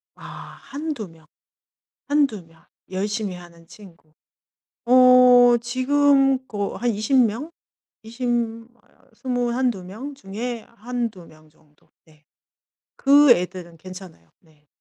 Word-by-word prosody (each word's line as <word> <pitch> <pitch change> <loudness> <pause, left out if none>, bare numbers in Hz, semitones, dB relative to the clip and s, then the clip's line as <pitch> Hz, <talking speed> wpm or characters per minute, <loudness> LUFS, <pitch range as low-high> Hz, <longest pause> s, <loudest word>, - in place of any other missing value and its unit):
아. - - -15 0.4
1-2 280 - -6
명, 160 -1 -20 0.8
1-2 275 - 0
명. 165 0 -24 0.3
열심히 205 0 -3
하는 170 -1 -15
친구. 170 -6 -17 0.7
어 250 -1 +6
지금 270 +1 +2
그 205 -2 -4
한 245 - -1
20 220 +5 0
명, 240 +10 -4 0.5
20 235 +3 -6 0.9
21-22 245 -4 -2
명 225 +11 -8
중에 230 0 -6
1-2 230 -5 -5
명 155 -1 -20
정도. 150 -1 -31 0.2
네. 155 -2 -25 0.7
그 285 0 +5
애들은 180 -5 0
괜찮아요. 180 - -12
네. 155 -3 -29
220 Hz, 130 characters per minute, -22 LUFS, 175-255 Hz, 0.9 s, 어